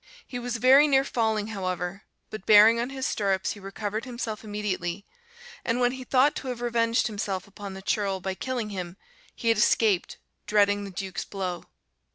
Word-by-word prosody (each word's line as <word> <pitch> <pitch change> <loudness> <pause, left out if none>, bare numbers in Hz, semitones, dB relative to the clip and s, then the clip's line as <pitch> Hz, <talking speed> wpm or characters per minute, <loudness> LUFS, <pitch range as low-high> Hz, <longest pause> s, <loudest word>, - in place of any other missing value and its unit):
He 245 - -6
was 245 -1 -3
very 265 +5 +6
near 270 -2 +4
falling, 220 -5 0
however, 185 -2 -4 0.3
but 215 -3 -8
bearing 220 +2 +8
on 240 +2 -1
his 270 -1 -4
stirrups 195 -2 0
he 205 - -7
recovered 205 +2 -4
himself 235 -4 -5
immediately; 205 -3 -3 0.6
and 230 +1 0
when 245 0 +3
he 260 0 -7
thought 265 +3 +3
to 270 - -6
have 250 -2 -4
revenged 235 0 +1
himself 200 -3 -3
upon 200 -1 -9
the 190 - -9
churl 195 -2 0
by 190 +1 -3
killing 230 +2 -3
him, 180 -2 -6 0.4
he 230 - -1
had 225 -2 +3
escaped, 210 -4 +2 0.3
dreading 205 -1 +3
the - - -7
Duke's 190 0 -5
blow. 185 -3 -5
210 Hz, 180 wpm, -26 LUFS, 195-240 Hz, 0.6 s, bearing